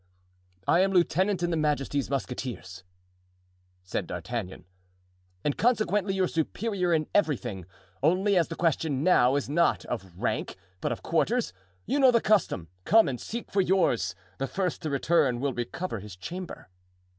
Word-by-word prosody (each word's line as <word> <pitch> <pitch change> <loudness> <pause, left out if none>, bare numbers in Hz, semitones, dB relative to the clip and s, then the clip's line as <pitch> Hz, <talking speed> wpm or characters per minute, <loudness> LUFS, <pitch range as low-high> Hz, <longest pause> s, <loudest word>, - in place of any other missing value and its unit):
"I 170 - +4
am 195 +1 +3
lieutenant 185 +1 +2
in 175 - +1
his 165 - 0
majesty's 145 -2 0
musketeers," 125 -8 -4 1.0
said 90 - -3
D'Artagnan, 95 +2 -5 0.8
"and 145 - 0
consequently 210 -4 +1
your 190 -1 +2
superior 180 +3 -1
in 155 -2 +2
everything; 120 - 0 0.3
only, 185 +7 +3
as 175 -2 +3
the 165 - -6
question 160 -4 0
now 135 -7 +4
is 145 - -1
not 170 +5 +2
of 95 -7 -6
rank, - - -2 0.2
but - - -2
of - - -5
quarters—you 95 - -1
know 265 -2 +7
the 235 -2 +4
custom—come 135 - +2
and 125 -3 -3
seek 235 +1 -6
for 195 - +3
yours; 145 - +1 0.2
the 135 - -1
first 185 +2 -2
to 155 - -3
return 140 -3 +2
will 140 0 -1
recover 120 - -4
his 100 -2 -10
chamber." 175 - -7
155 Hz, 145 wpm, -28 LUFS, 120-185 Hz, 1.0 s, know